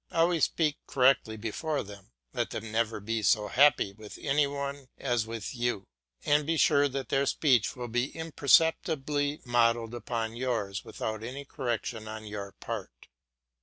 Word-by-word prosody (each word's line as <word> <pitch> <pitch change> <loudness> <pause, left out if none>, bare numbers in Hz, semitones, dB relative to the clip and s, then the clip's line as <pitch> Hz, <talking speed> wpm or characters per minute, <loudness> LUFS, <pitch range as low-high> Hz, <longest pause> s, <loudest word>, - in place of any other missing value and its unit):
Always 165 0 +3
speak 155 -3 0
correctly 125 -4 +3
before 140 +8 -2
them, 100 -2 -12 0.2
let - - -1
them 115 0 -6
never 110 0 0
be 110 +2 -2
so 105 -1 +3
happy 135 -7 +4
with 105 0 -11
any 145 0 +2
one 140 -1 -5
as 120 -4 0
with 115 -3 -5
you, 120 -5 -1 0.4
and 150 +1 +4
be 165 +2 0
sure 145 -1 +4
that 135 -1 -4
their 135 0 +2
speech 120 -9 +2
will 125 -1 -5
be 120 +3 0
imperceptibly 150 -2 +2
modelled 115 -1 +2
upon 115 -1 -3
yours 115 -6 -2
without 110 0 -5
any 135 +4 -6
correction 120 -5 -3
on 110 0 -7
your 100 -2 -6
part. - - -7
120 Hz, 155 wpm, -29 LUFS, 110-140 Hz, 0.4 s, happy